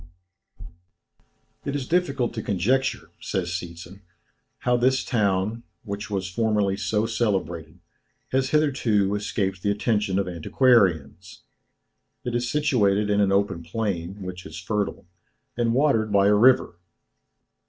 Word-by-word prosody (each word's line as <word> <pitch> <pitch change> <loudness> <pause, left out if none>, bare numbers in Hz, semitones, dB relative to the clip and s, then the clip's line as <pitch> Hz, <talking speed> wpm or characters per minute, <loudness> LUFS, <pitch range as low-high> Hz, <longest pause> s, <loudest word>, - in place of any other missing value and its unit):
"It 140 - -3
is 135 -3 -3
difficult 140 -9 0
to 110 - -4
conjecture," 120 +8 0
says 90 -2 -3
Seetzen, 85 +2 -7 0.6
"how 125 0 +2
this 130 +2 +2
town, 105 -1 0 0.2
which 105 -1 -6
was 95 -2 -2
formerly 105 0 0
so 105 +2 0
celebrated, 95 -9 -2 0.5
has 130 0 +1
hitherto 125 -10 +2
escaped 100 -3 -2
the 100 - 0
attention 105 -2 0
of 100 - 0
antiquarians. 90 - +1 0.8
It 120 - -3
is 120 0 -1
situated 105 -8 +2
in 105 0 +3
an 100 -1 +2
open 100 -3 +1
plain, 95 0 -4
which 90 -1 -7
is 80 - -9
fertile, 100 +3 -3 0.5
and 120 -1 +1
watered 120 -5 +2
by 100 0 +4
a - - +5
river. 110 -5 +4
105 Hz, 125 wpm, -24 LUFS, 95-120 Hz, 0.8 s, a